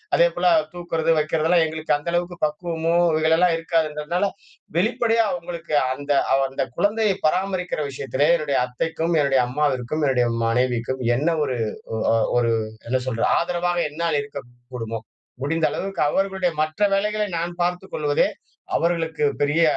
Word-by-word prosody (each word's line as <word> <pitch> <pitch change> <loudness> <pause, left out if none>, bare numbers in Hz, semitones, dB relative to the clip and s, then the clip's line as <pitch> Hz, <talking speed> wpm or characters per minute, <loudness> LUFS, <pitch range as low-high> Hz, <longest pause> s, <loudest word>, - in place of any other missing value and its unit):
அதேபோல - - +3 0.3
தூக்குறது, 165 -2 -1
வைக்கிறது 155 +1 0
எல்லாம் 170 -1 +4
எங்களுக்கு 155 0 -2
அந்த 145 - -13
அளவுக்கு 175 0 -1
பக்குவமோ 165 +1 -2 0.3
இதுலெல்லாம் 165 +2 +3
இருக்காதுன்றதுனால 165 +2 0 0.5
வெளிப்படையா 225 +3 +2
அவங்களுக்கு 170 -2 -4 0.2
அந்த 145 +2 -5 0.4
அந்த 135 - -2
குழந்தையை 210 0 +2
பராமரிக்கிற 185 +1 -1
விஷயத்திலே 135 +1 -1
என்னுடைய 150 -4 -1
அத்தைக்கும் 160 +6 -2
என்னுடைய 135 -2 +3
அம்மாவிற்கும், 145 +1 -1
என்னுடைய 125 -2 +2 0.2
மனைவிக்கும் 125 +2 0 0.2
என்ன 145 +5 -1 0.2
ஒரு 130 -3 -2 0.4
ஒ - - -2 0.2
அ - - +4 0.2
ஒரு 115 -1 +2 0.4
என்ன 130 +1 +2
சொல்றது? 115 -2 0
ஆதரவாக 175 0 -1
என்னால் 160 -1 0
இருக்கக்கூடுமோ 120 -4 -7 0.4
முடிந்த 165 +3 +1
அளவுக்கு 195 -2 -3
அவர்களுடைய 190 -1 0
மற்ற 155 +6 -6
வேலைகளை 210 +1 0
நான் 175 +1 -4
பார்த்துக் 180 +2 -3
கொள்வதே 145 -1 +2 0.5
அவர்களுக்கு 165 -2 -1 0.2
பெரிய 150 +3 +2
160 Hz, 130 wpm, -23 LUFS, 140-175 Hz, 0.5 s, எல்லாம்